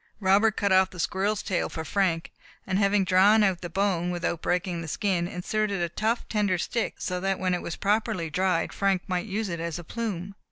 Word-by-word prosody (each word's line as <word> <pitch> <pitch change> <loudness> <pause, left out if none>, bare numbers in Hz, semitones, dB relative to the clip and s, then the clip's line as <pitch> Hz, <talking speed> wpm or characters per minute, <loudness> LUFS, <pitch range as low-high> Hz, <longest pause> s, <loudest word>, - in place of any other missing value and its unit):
Robert 205 +2 +3
cut 200 -1 +1
off 190 0 +5
the 180 - -11
squirrel's 200 +5 0
tail 185 - -1
for 160 - -5
Frank; 180 -4 0 0.3
and 190 0 0
having 200 0 +3
drawn 195 +4 +5
out 190 -4 +1
the 175 - -5
bone, 180 -1 0
without 175 -1 -2
breaking 180 -1 -1
the 165 - -6
skin, 180 -1 0
inserted 200 +3 -2
a 170 -1 -1
tough, 220 +7 -1
slender 205 -4 +1
stick, 230 +6 -2
so 180 -1 -3
that 195 +1 0
when 185 -1 0
it 180 - -1
was 165 - -5
properly 210 -4 0
dried, 180 +2 0
Frank 195 -2 +1
might 180 +2 -2
use 210 +2 -2
it 170 -2 -4
as 170 -1 -3
a 175 - -7
plume. 200 -2 -4
190 Hz, 210 wpm, -26 LUFS, 175-205 Hz, 0.3 s, off